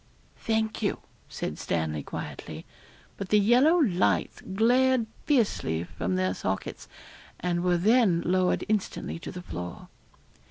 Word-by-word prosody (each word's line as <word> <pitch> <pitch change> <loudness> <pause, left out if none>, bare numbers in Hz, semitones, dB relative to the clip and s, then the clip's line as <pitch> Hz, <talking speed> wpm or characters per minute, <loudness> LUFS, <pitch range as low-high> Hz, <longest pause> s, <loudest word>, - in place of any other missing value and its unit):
'Thank 220 -1 -1
you,' 205 - -1 0.3
said - - -5
Stanley 80 -2 -1
quietly, - - -7 0.5
but 195 -2 -5
the 210 - +5
yellow 245 - +5
lights 200 - +1
glared 245 +5 +3 0.2
fiercely 205 - +1
from 90 +1 -3
their 95 0 +1
sockets, 95 0 -4 0.5
and 175 -1 -1
were 180 -1 +3
then 205 -2 +4
lowered 185 +1 +2
instantly 210 -5 -2
to - - -7
the 180 -1 -8
floor. 90 - -7
190 Hz, 125 wpm, -27 LUFS, -, 0.5 s, the